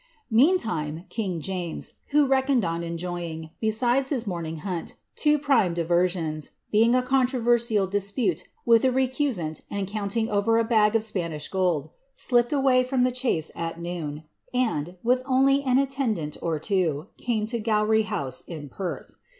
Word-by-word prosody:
Meantime, 220 Hz, -, +2 dB
king 190 Hz, -7 st, -2 dB
James, 175 Hz, -1 st, -4 dB
who 295 Hz, 0 st, +4 dB
reckoned 265 Hz, -4 st, +2 dB
on 165 Hz, 0 st, -2 dB
enjoying, 170 Hz, -1 st, -5 dB
besides 240 Hz, +5 st, +1 dB
his 250 Hz, -6 st, -1 dB
morning 170 Hz, -4 st, -4 dB
hunt, 180 Hz, -4 st, -4 dB, 0.2 s
two 300 Hz, -1 st, +3 dB
prime 270 Hz, -, +2 dB
diversions, 170 Hz, -2 st, 0 dB, 0.2 s
being 230 Hz, +3 st, +4 dB
a 255 Hz, -, +3 dB
controversial 240 Hz, -5 st, +2 dB
dispute 200 Hz, -1 st, -1 dB, 0.2 s
witli 230 Hz, +1 st, +5 dB
a -, -, -1 dB
recusant, 255 Hz, -, -1 dB
and 200 Hz, -1 st, -2 dB
counting 210 Hz, +2 st, -2 dB
over 220 Hz, +2 st, +2 dB
a 230 Hz, -, +3 dB
bag 220 Hz, -2 st, +3 dB
of 225 Hz, -, +3 dB
Spanish 170 Hz, -8 st, -3 dB
gold, 175 Hz, -6 st, 0 dB, 0.2 s
slipped 240 Hz, -1 st, +1 dB
away 270 Hz, -3 st, +4 dB
from 255 Hz, 0 st, +1 dB
the 255 Hz, -, +2 dB
chase 245 Hz, -, -1 dB
at 165 Hz, 0 st, -4 dB
noon, 165 Hz, -3 st, -5 dB, 0.3 s
and, 180 Hz, -9 st, 0 dB
with 250 Hz, +2 st, +3 dB
only 270 Hz, +1 st, +4 dB
an 260 Hz, -2 st, +2 dB
attendant 260 Hz, -, -1 dB
or 165 Hz, -2 st, -1 dB
two, 160 Hz, -3 st, 0 dB
came 225 Hz, -3 st, -1 dB
to 235 Hz, +2 st, -3 dB
Oowry 215 Hz, 0 st, +2 dB
House, 140 Hz, -12 st, -2 dB
in 155 Hz, -4 st, -8 dB
Perth.' 180 Hz, +6 st, -5 dB
210 Hz, 150 wpm, -25 LUFS, 170-250 Hz, 0.3 s, witli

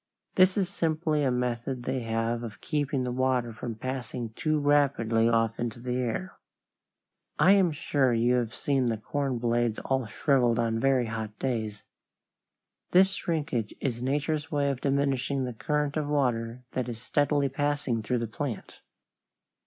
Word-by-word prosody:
This 185 Hz, +1 st, +4 dB
is 195 Hz, -3 st, +2 dB
simply 155 Hz, -3 st, 0 dB
a 135 Hz, -, +3 dB
method 125 Hz, 0 st, -2 dB
they 130 Hz, +1 st, -1 dB
have 115 Hz, 0 st, -1 dB
of 115 Hz, -3 st, -7 dB
keeping 145 Hz, -4 st, -1 dB
the 125 Hz, -, -2 dB
water 125 Hz, -2 st, 0 dB
from 115 Hz, 0 st, -5 dB
passing 125 Hz, 0 st, -4 dB
too 155 Hz, +5 st, 0 dB
rapidly 140 Hz, -6 st, +3 dB
off 115 Hz, -1 st, +1 dB
into 120 Hz, -1 st, -3 dB
the 125 Hz, +1 st, -2 dB
air. 130 Hz, +10 st, -3 dB, 1.0 s
I -, -, +6 dB
am 195 Hz, -4 st, +5 dB
sure 145 Hz, -4 st, +1 dB
you 120 Hz, +1 st, +3 dB
have 120 Hz, -2 st, -1 dB
seen 135 Hz, -3 st, +1 dB
the 115 Hz, -1 st, 0 dB
corn 135 Hz, +4 st, -2 dB
blades 120 Hz, -1 st, +1 dB
all 130 Hz, -3 st, -1 dB
shriveled 120 Hz, -1 st, +2 dB
on 115 Hz, -1 st, +1 dB
very 135 Hz, -1 st, +3 dB
hot 110 Hz, -1 st, -5 dB
days. 110 Hz, -5 st, -2 dB, 1.1 s
This 190 Hz, +2 st, +5 dB
shrinkage 150 Hz, -, -2 dB
is 120 Hz, -4 st, -2 dB
nature's 150 Hz, +4 st, -1 dB
way 140 Hz, -2 st, +1 dB
of 130 Hz, -, -5 dB
diminishing 140 Hz, -1 st, +1 dB
the 125 Hz, -1 st, -3 dB
current 150 Hz, +4 st, -1 dB
of 155 Hz, -2 st, -1 dB
water 125 Hz, -4 st, 0 dB
that 125 Hz, -1 st, -2 dB
is 115 Hz, -2 st, -5 dB
steadily 145 Hz, +3 st, +1 dB
passing 140 Hz, -3 st, -1 dB
through 125 Hz, +3 st, -1 dB
the 115 Hz, -1 st, -2 dB
plant. 120 Hz, +1 st, -5 dB
130 Hz, 160 wpm, -28 LUFS, 115-145 Hz, 1.1 s, I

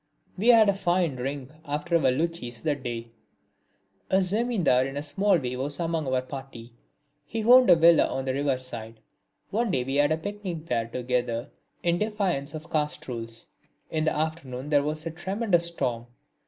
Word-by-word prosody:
We 200 Hz, +5 st, -2 dB
had 230 Hz, -3 st, +7 dB
a 200 Hz, -, +4 dB
fine 180 Hz, -5 st, +1 dB
drink 135 Hz, +1 st, -4 dB
after 150 Hz, +3 st, -2 dB
our 135 Hz, -5 st, +3 dB
luchis 130 Hz, -5 st, -3 dB
that 145 Hz, -3 st, -1 dB
day. 115 Hz, -2 st, -5 dB, 1.0 s
A -, -, +2 dB
Zamindar 195 Hz, -, +2 dB
in 135 Hz, +1 st, -6 dB
a 145 Hz, -, -3 dB
small 195 Hz, +5 st, +2 dB
way 125 Hz, -4 st, -3 dB
was 140 Hz, +3 st, -4 dB
among 165 Hz, -3 st, -1 dB
our 130 Hz, -1 st, +1 dB
party. 130 Hz, -3 st, -9 dB, 0.5 s
He 220 Hz, +9 st, -4 dB
owned 250 Hz, +1 st, +7 dB
a 175 Hz, -, +9 dB
villa 165 Hz, 0 st, +6 dB
on 135 Hz, -, -3 dB
the 130 Hz, -, 0 dB
river 140 Hz, -1 st, +1 dB
side. 115 Hz, -3 st, -8 dB, 0.5 s
One 225 Hz, +3 st, 0 dB
day 130 Hz, -8 st, +1 dB
we 135 Hz, +2 st, -2 dB
had 145 Hz, +1 st, +3 dB
a 155 Hz, -, +2 dB
picnic 185 Hz, -2 st, -5 dB
there 115 Hz, -5 st, -1 dB
together, 125 Hz, 0 st, -2 dB, 0.3 s
in 170 Hz, 0 st, +2 dB
defiance 195 Hz, -9 st, -1 dB
of 155 Hz, +2 st, -9 dB
caste 150 Hz, -1 st, -1 dB
rules. 115 Hz, -2 st, -5 dB, 0.4 s
In 155 Hz, 0 st, 0 dB
the 155 Hz, -, +1 dB
afternoon 150 Hz, -4 st, -3 dB
there 145 Hz, -2 st, +4 dB
was 155 Hz, +2 st, -2 dB
a 165 Hz, -, -3 dB
tremendous 180 Hz, +1 st, 0 dB
storm. 120 Hz, -8 st, -3 dB
150 Hz, 180 wpm, -27 LUFS, 130-175 Hz, 1.0 s, a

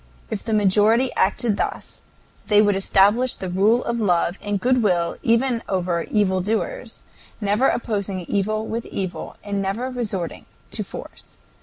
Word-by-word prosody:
If 210 Hz, -, -3 dB
the 225 Hz, -, -4 dB
majority 215 Hz, +4 st, +3 dB
acted 205 Hz, +2 st, +1 dB
thus -, -, -3 dB, 0.5 s
they 210 Hz, -1 st, +5 dB
would 205 Hz, -1 st, +4 dB
establish 205 Hz, +6 st, +3 dB
the 185 Hz, -2 st, -5 dB
rule 210 Hz, +7 st, +3 dB
of 235 Hz, 0 st, -1 dB
love 180 Hz, -3 st, +1 dB
and 205 Hz, -1 st, -2 dB
good 255 Hz, +3 st, +2 dB
will 175 Hz, -5 st, +1 dB
even 235 Hz, 0 st, +2 dB
over 180 Hz, -3 st, 0 dB
evil 190 Hz, -3 st, +2 dB
doers, 225 Hz, -, -3 dB, 0.4 s
never 210 Hz, +5 st, +2 dB
opposing 200 Hz, -5 st, -1 dB
evil 210 Hz, +4 st, -1 dB
with 230 Hz, +1 st, -4 dB
evil, 185 Hz, -2 st, -5 dB
and 200 Hz, -1 st, -2 dB
never 220 Hz, +7 st, -2 dB
resorting 205 Hz, -9 st, -4 dB, 0.2 s
to -, -, -1 dB
force. -, -, -11 dB
205 Hz, 150 wpm, -22 LUFS, 190-230 Hz, 0.5 s, they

